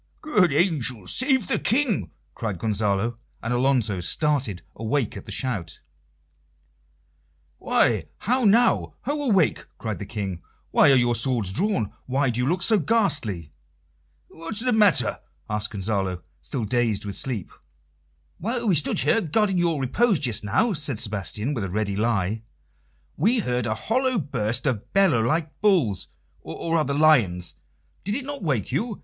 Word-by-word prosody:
"Good 210 - +3
angels 135 - +1
save 260 -6 +2
the - - +1
King!" 240 -2 +1 0.2
cried 105 -5 -4
Gonzalo; 105 +3 0 0.3
and 120 +2 -1
Alonso 120 -6 +1
started 130 - -1
awake 115 +2 -1
at - - -9
the - - -7
shout. 100 - -3 1.8
"Why! - - +2 0.2
how 250 +4 +1
now? 230 +3 +3
Ho, 290 +3 -2
awake!" 190 -7 +2
cried 110 -3 -4
the 100 - -6
King. 95 -6 -4 0.3
"Why - - +6
are - - +6
your 120 -1 +3
swords 115 -4 0
drawn? 110 - 0
Why 135 0 +1
do 120 - -3
you 125 - 0
look 180 +5 0
so 220 -3 +4
ghastly?" 145 - 0 0.7
"What's 165 +7 -6
the 250 0 +1
matter?" 200 - +3 0.3
added 105 0 -2
Gonzalo, 95 -3 -2 0.2
still 125 -6 -4
dazed 115 -2 0
with 100 -1 -5
sleep. 120 -9 -4 0.9
"While 235 +5 -2
we 195 - +4
stood 155 -3 +2
here 225 - +3
guarding 195 +2 +1
your 170 -4 +1
repose 200 - +2
just 120 -6 -1
now," 210 - +1
said 145 -6 -2
Sebastian, 105 +4 -2
with 115 -7 -3
a 95 - -3
ready 100 +1 -2
lie, 105 -1 0 0.8
"we 220 - +3
heard 125 - -1
a 110 - -1
hollow 255 - 0
burst 125 - -1
of 120 -7 -2
bellowing 165 -13 +3
like 155 +2 -2
bulls, 165 - +2 0.3
or, 165 - -5
rather, 150 -4 +1
lions. 110 - +3 0.5
Did 205 +3 -2
it 270 0 -3
not 285 0 -5
wake 135 - -1
you? 210 - -2
130 Hz, 155 wpm, -24 LUFS, -, 1.8 s, Why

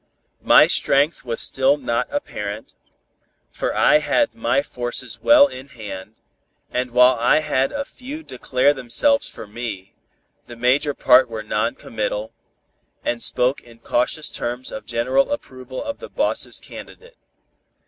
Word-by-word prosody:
My - - +7
strength 145 +4 +1
was 120 -3 -3
still 135 +2 +3
not 125 -3 -2
apparent, 105 - -5 0.8
for - - -3
I 150 - +5
had 150 - +1
my 235 +4 0
forces 120 - -5
well 290 -1 +7
in 135 - -8
hand, 110 -5 -9 0.6
and 125 0 -2
while 125 +1 +5
I 120 +6 +3
had 135 -3 0
a 280 0 -4
few 280 +6 -9
declare 135 - +1
themselves 280 - +3
for - - -10
me, 105 -3 -7 0.5
the 120 - -10
major 130 +4 +1
part 125 0 +5
were 110 -1 -6
non 105 +2 -1
committal, 110 0 -4 0.7
and 120 -1 -1
spoke 125 +4 +1
in 115 -1 -17
cautious 125 +6 -1
terms 125 +2 -4
of 110 - -8
general 130 - +1
approval 130 - -6
of 285 - -6
the 480 - -9
boss's - - 0
candidate. 475 +1 -13
125 Hz, 140 wpm, -21 LUFS, 115-150 Hz, 0.8 s, My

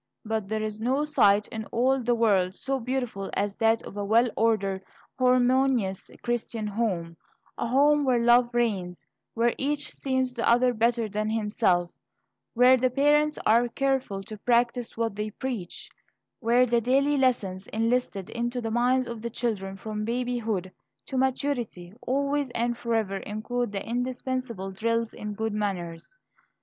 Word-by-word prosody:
But 220 -2 -2
there 215 0 -1
is 215 0 -4
no 260 +6 +1
sight 205 -9 +3
in 220 -1 -5
all 260 +4 +1
the 240 0 +1
world 195 -5 +2
so 270 +4 -2
beautiful 245 -5 -3
as 200 0 -1
that 225 0 +2
of - - -10
a 205 - -3
well 230 +4 +3
ordered, 200 -4 +1 0.4
harmonious 255 -5 +2
Christian 235 -2 -2
home, 195 -6 -2 0.4
a - - -2
home 290 +4 +4
where 255 -3 +3
love 240 +1 +5
reigns; 200 -7 -1 0.3
where 235 +1 +2
each 290 +1 -1
esteems 260 -2 -1
the 240 -1 0
other 245 +1 +4
better 230 0 +1
than 210 +1 -2
himself; 210 -5 +1 0.6
where 250 +2 +6
the 255 +1 +2
parents 295 +3 +3
are 235 +3 +4
careful 260 -6 -1
to 215 +1 -9
practise 240 +1 +1
what 225 -3 -1
they 210 +1 -3
preach; 220 -6 -5 0.5
where 240 +1 +4
the 235 -1 +2
daily 275 +5 +2
lessons 210 -8 0
instilled 225 -3 -1
into 240 +1 -2
the 225 -2 -3
minds 250 +2 +2
of 235 -2 -6
the 235 - -3
children 210 -5 -3
from 215 +1 -5
babyhood 230 -5 -2 0.3
to - - -7
maturity 255 -8 -1
always 280 +1 0
and 240 +1 0
forever 225 -4 -1
include 220 +3 -3
the 200 -1 -4
indispensable 245 -4 -3
drills 230 +3 -1
in 210 0 -6
good 220 +1 -2
manners. 185 - -4
235 Hz, 155 wpm, -27 LUFS, 210-250 Hz, 0.6 s, where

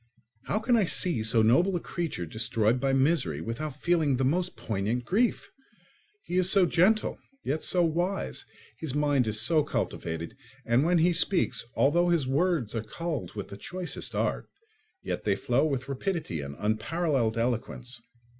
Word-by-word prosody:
How - - 0
can 235 +3 +2
I 210 - +3
see 170 -7 +1
so 110 +1 +3
noble 170 - +3
a - - 0
creature 165 - -4
destroyed 110 +5 +1
by 135 +1 +1
misery 135 - +1
without 135 - -5
feeling 160 -6 +2
the 130 - +1
most 180 +6 0
poignant 110 +4 -2
grief? 225 - 0 0.7
He 180 - -3
is 185 0 +4
so 195 -2 +5
gentle, 185 +6 +2 0.2
yet 150 +3 -1
so 180 -1 +2
wise; 165 - -2 0.4
his 150 -4 -3
mind 145 -4 +2
is 110 0 +2
so 155 +8 +3
cultivated, 85 - -4 0.3
and 120 +4 +3
when 175 +2 +3
he 170 +2 +3
speaks, 180 -5 +1
although 170 +5 +3
his 170 -6 +2
words 140 - 0
are 115 - -1
culled 155 +5 -5
with 100 - -6
the 100 - -8
choicest 180 - -4
art, - - -1 0.5
yet - - -3
they 100 -2 +1
flow 125 +9 +1
with 135 -2 -3
rapidity 140 - -3
and 70 0 -7
unparalleled 115 +2 0
eloquence. 120 +1 -3
140 Hz, 165 wpm, -28 LUFS, 115-175 Hz, 0.7 s, so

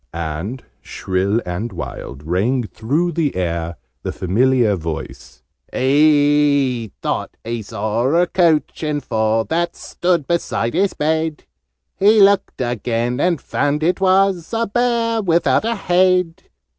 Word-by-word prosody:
And, 85 +10 -4 0.2
shrill 95 +4 -1
and 90 +7 -4
wild, 70 +1 -7
rang 105 - 0
through 135 - -1
the 165 -4 -1
air 85 -2 -2 0.3
the - - -4
familiar 115 +3 +2
voice: 80 -6 -7 0.3
"He 145 -4 +3
thought - - -3
he 115 0 -4
saw 110 +3 -2
a 175 +1 +4
Coach 170 -4 +1
and 150 -2 -2
Four 110 -1 0
That 170 +1 -1
stood 175 -4 -1
beside 150 -8 -1
his 190 +4 +1
bed: 160 0 -1 0.5
He 210 +3 +4
looked 200 -7 +3
again, 120 0 -1
and 170 -1 +1
found 145 +3 -1
it 180 +3 +1
was 190 -2 +2
A 230 - +1
Bear 230 0 0
without 175 +2 +2
a 230 +1 0
Head. 180 -3 +1
145 Hz, 130 wpm, -19 LUFS, 110-175 Hz, 0.5 s, a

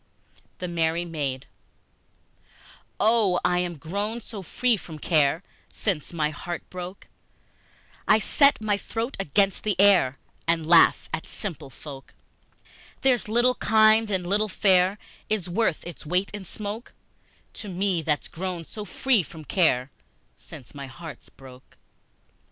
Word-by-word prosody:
The 180 - -4
Merry 170 0 0
Maid 140 -6 -3 1.5
OH 210 -5 +4
I 180 0 +3
am 175 -2 -2
grown 200 +9 -3
so 215 -3 -8
free 240 +6 +1
from 165 -5 -9
care 155 +1 +2 0.3
Since 180 -9 -2
my 155 -3 0
heart 175 +3 -6
broke! 180 +1 -7 1.0
I 215 - +6
set 280 +6 +4
my 210 -2 0
throat 230 +5 -4
against 195 +2 +1
the 210 -3 -1
air, 185 -10 +5 0.3
I 165 - +5
laugh 165 +1 +5
at 160 - -3
simple 155 -9 -6
folk! 135 0 -11 0.9
There's 255 -4 +3
little 240 +3 +3
kind 220 -1 +4
and 190 -3 -1
little 210 +4 +1
fair 185 0 +3 0.3
Is 215 -5 -1
worth 180 -2 0
its 175 -2 -9
weight 180 +5 0
in 205 -2 -6
smoke 210 +5 -7 0.6
To 210 - -7
me, 185 -1 0
that's 150 -2 -1
grown 180 0 -5
so 210 +5 -8
free 250 0 +2
from 160 -1 -11
care 140 -8 +2 0.4
Since 120 - -13
my 140 -1 -7
heart 150 0 -10
broke! 130 -1 -15
180 Hz, 135 wpm, -25 LUFS, 160-210 Hz, 1.5 s, I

